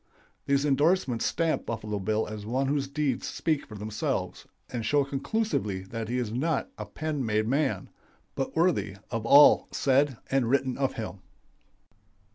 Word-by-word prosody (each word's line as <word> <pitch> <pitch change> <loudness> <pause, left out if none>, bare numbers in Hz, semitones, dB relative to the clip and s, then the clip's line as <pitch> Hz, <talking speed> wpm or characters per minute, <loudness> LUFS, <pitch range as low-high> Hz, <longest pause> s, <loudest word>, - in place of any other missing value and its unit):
These 140 +1 +2
indorsements 145 -3 +2
stamp 165 -2 0
Buffalo 105 -2 -3
Bill 110 +3 0
as 105 -1 -6
one 125 +6 -1
whose 140 -1 0
deeds 140 -2 -1
speak 155 -3 -1
for 105 - -10
themselves, 105 +1 -3 0.2
and 120 -2 -3
show 145 +5 +3
conclusively 135 - -2
that 110 +3 -6
he 125 - -1
is 120 -4 -2
not 150 +4 -1
a - - -7
pen 155 -3 -3
made 110 -1 0
man, 140 +2 0 0.5
but 135 - -3
worthy 165 - +1 0.2
of 115 -1 -3
all 145 +3 +7
said 135 -1 +2
and 135 -4 +2
written 130 -1 +1
of 135 -1 0
him. 110 -4 -6
130 Hz, 155 wpm, -28 LUFS, 110-145 Hz, 0.5 s, all